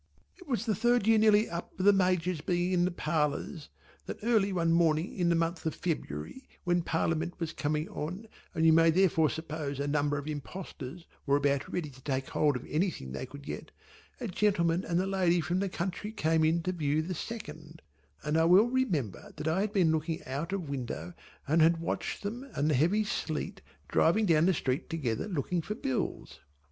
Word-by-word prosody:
It 365 - -15
was 235 -5 -1
the 220 - +1
third 240 +2 +2
year 225 0 +5
nearly 215 0 +5
up 170 +1 -6
of 185 - 0
the 205 - +8
Major's 180 -3 +1
being 175 +1 0
in 175 -1 +3
the - - +2
parlours 155 -2 -2 0.4
that - - -5
early 215 -4 +3
one 165 -3 +2
morning 165 0 +2
in 175 -3 +1
the 170 - +3
month 165 +1 -1
of 160 - -2
February 160 - -4
when 175 -1 +2
Parliament 165 +1 -1
was 165 -2 -3
coming 150 +2 -1
on 185 +9 -5 0.3
and 160 -1 +2
you 160 - +7
may 165 +1 +6
therefore 165 -3 +3
suppose 155 -3 -4
a 140 - -1
number 145 0 +1
of 140 - -5
impostors 155 0 -7 0.2
were 140 - +4
about 140 -1 0
ready 155 -5 -3
to 130 0 -16
take 135 -1 -2
hold 150 -2 +2
of 125 - -5
anything 150 - -1
they 65 0 -5
could 140 +1 -11
get, - - -6 0.5
a 245 - -3
gentleman 180 -3 +1
and 170 +1 0
a 185 - +1
lady 185 -3 +2
from 175 +3 0
the 195 0 0
country 185 +4 -4
came 160 -6 +1
in 165 +2 +2
to 185 - 0
view 155 -3 0
the 185 +3 -3
Second, 160 -5 -8 0.4
and 150 +2 +1
I 160 - +4
well 190 +7 +6
remember 170 - -1
that 150 - -4
I 165 +5 +2
had 210 0 -1
been 185 -6 +3
looking 160 +1 -2
out 145 +7 -4
of 190 -5 -3
window 120 - -4 0.3
and 160 +3 +3
had 165 +1 +5
watched 165 +5 -3
them 240 +7 -5
and 150 +2 +1
the - - +3
heavy 175 +11 +3
sleet 160 -6 -3 0.3
driving 210 +7 +3
down 165 -2 +4
the 190 - +4
street 135 +3 -2
together 135 - -2
looking 175 -1 -1
for 210 +6 -4
bills. 130 -11 -3
165 Hz, 200 wpm, -30 LUFS, 150-185 Hz, 0.5 s, the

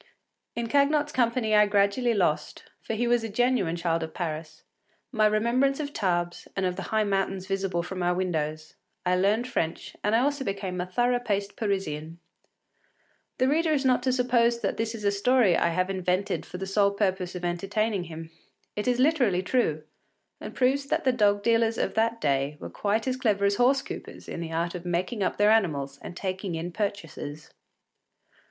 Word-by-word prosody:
In 235 - -2
Cagnotte’s 290 +3 +2
company 235 -3 +1
I 210 0 +6
gradually 205 +4 +2
lost, 175 -6 0 0.2
for 225 - -4
he 240 +2 0
was 240 -1 +2
a 225 - -3
genuine 230 -6 +1
child 170 -1 0
of 160 -1 -6
Paris, 155 -2 -5 0.5
my 215 -4 +3
remembrance 240 +6 +2
of 290 -1 -4
Tarbes 175 -4 -1
and 195 - 0
of 180 -1 -1
the - - -5
high 220 0 +2
mountains 195 -2 -1
visible 190 -3 -1
from 185 +1 -5
our 175 0 +1
windows; 155 -4 -2 0.3
I 180 0 +3
learned 205 +6 +2
French 165 -10 -3
and 210 +2 +2
I 230 - +4
also 285 +1 0
became 195 -4 -3
a 180 - -4
thorough 245 +6 +1
paced 205 -4 -2
Parisian. 170 -6 -3 1.2
The 255 - +2
reader 320 +4 +2
is 280 -3 +1
not 255 -1 +3
to 260 - +1
suppose 240 -2 +2
that - - -1
this 225 +1 -2
is 215 - -8
a 200 - +3
story 205 -2 +3
I 170 - +2
have 185 +3 0
invented 185 +1 -1
for 180 - -7
the 190 - -4
sole 200 +1 +3
purpose 190 -3 -1
of 180 -1 -4
entertaining 195 +3 -1
him. 165 0 -9 0.4
It 210 - -3
is 250 -1 +2
literally 250 - +2
true, 180 - 0 0.6
and - - -8
proves 270 +2 +2
that - - 0
the 260 - +4
dog 205 -3 +2
dealers 230 0 +2
of - - -1
that 230 +1 +1
day 140 -1 0
were - - -8
quite 215 +4 -1
as 255 0 0
clever 210 -6 +1
as 200 0 +2
horse 265 +2 +3
coupers - - -9
in - - -5
the 165 -1 -5
art 170 +1 -1
of 180 -2 -6
making 180 +5 -2
up 190 - 0
their 210 +1 +5
animals 140 -10 +1
and 175 - -8
taking 190 -2 -3
in 165 +2 -4
purchasers. 165 -7 -5
200 Hz, 190 wpm, -27 LUFS, 180-235 Hz, 1.2 s, I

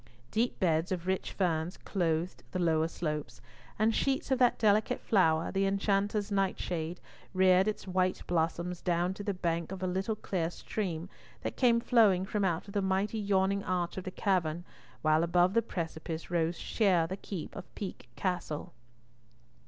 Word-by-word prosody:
Deep 235 +3 0
beds 165 -1 +1
of 180 -2 -2
rich 190 0 -1
ferns 170 -2 -1
clothed 170 -2 -1
the - - -1
lower 160 -2 +2
slopes, 150 -3 -4 0.4
and 220 +2 +3
sheets 270 +2 0
of 265 - +3
that 245 -2 +4
delicate 215 -1 +3
flower, 165 -6 +2
the 195 0 +1
enchanter's 200 +1 0
nightshade, 180 -4 -1 0.4
reared 185 +1 +5
its 215 - -2
white 185 0 0
blossoms 170 +1 -1
down 175 +1 +1
to 205 - -7
the 200 - 0
bank 170 -2 -2
of 190 -1 -5
a - - +1
little 190 +4 -1
clear 175 -5 -2
stream 175 -2 -4 0.4
that - - -3
came 235 -2 +4
flowing 215 -6 +4
from 205 +1 -1
out 175 -1 0
of 200 - -9
the 200 - +1
mighty 195 +3 0
yawning 200 -1 +1
arch 180 -2 -1
of 190 - -4
the 185 - -4
cavern, 175 -4 0 0.4
while 155 +1 +4
above 175 +2 +3
the 230 - +4
precipice 165 -4 -5
rose 170 0 +1
sheer 185 -7 +2
the 185 +3 -4
keep 190 -4 -7
of - - -10
Peak 190 -10 -6
Castle. 180 -5 -3
185 Hz, 170 wpm, -31 LUFS, 170-200 Hz, 0.4 s, reared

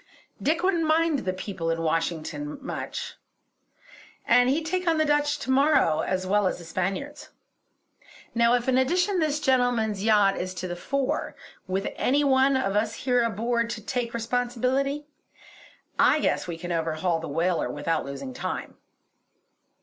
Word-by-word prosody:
Dick 320 +4 +1
wouldn't 345 -4 +2
mind 320 -1 +2
the 185 - -2
people 185 -2 -4
in 165 0 0
Washington 165 - -2
much, 275 - -6 1.1
and 245 +1 +5
he'd 310 +4 0
take 365 +2 -2
on 325 -1 +3
the 310 - +3
Dutch 295 0 +2
to 270 -2 -3
morrow 275 - +3
as 185 +2 -1
well 200 +1 +2
as - - -2
the 175 - -11
Spaniards. 190 - -4 1.0
Now, 235 +1 +4
if 245 0 -2
in 260 0 +3
addition 360 +8 +1
this 305 -2 +1
gentleman's 245 -7 +1
yacht 210 -3 +4
is 185 +1 -4
to 185 - -4
the 175 - -4
fore, 275 - -2 0.3
with 190 +1 -1
any 285 +3 +2
one 270 0 +4
of 205 -7 -1
us 210 +1 0
here 250 -2 +1
aboard 230 +1 0
to 235 -2 -5
take 240 -2 -2
responsibility, 250 +5 -1 0.9
I - - +5
guess - - 0
we 170 -2 -4
can 175 +1 -6
overhaul 165 +1 0
the 165 - -6
whaler 170 -1 0
without 150 +4 -1
losing 195 - -7
time." 255 - -5
240 Hz, 155 wpm, -26 LUFS, 185-280 Hz, 1.1 s, and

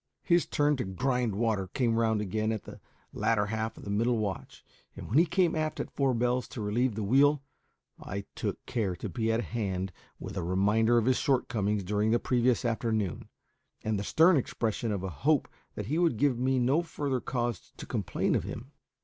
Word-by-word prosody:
His 175 -1 +3
turn 145 0 +2
to 125 - -1
"grind 120 +3 -1
water" 105 -3 0
came 115 +4 0
round 110 -2 +2
again 110 +2 -1
at 110 -3 -3
the - - -11 0.3
latter 105 -1 +1
half 110 +1 -3
of - - -11
the 100 - -5
middle 115 +4 +2
watch, 100 -3 -4 0.3
and - - -8
when 130 +9 +3
he 170 - +4
came 175 -2 +2
aft 155 -1 -2
at - - -4
four 135 -3 +1
bells 125 +2 0
to 115 - -7
relieve 110 +3 0
the 110 - -2
wheel 140 +6 +4 0.6
I 100 0 -5
took - - -4
care 100 -6 -1
to - - -5
be 115 -2 -1
at 115 +1 +1
hand 95 -5 -3 0.3
with - - -7
a 90 - -1
reminder 105 +6 +3
of 115 - +2
his 130 0 +3
shortcomings 105 -6 0
during 105 +3 0
the 115 - +4
previous 125 0 +1
afternoon, 110 -5 -1 0.5
and 110 -2 0
the - - -3
stern 165 - +5
expression 115 -3 -1
of 100 -3 -2
a 95 - -2
hope 150 -1 +3 0.3
that 105 - -4
he 150 - -1
would 170 -10 +2
give 130 -1 +2
me 130 +1 +2
no 130 +6 +3
further 145 -6 -2
cause 120 -4 -3
to - - -7
complain - - -1
of - - +1
him. - - -7
115 Hz, 200 wpm, -29 LUFS, 105-130 Hz, 0.6 s, stern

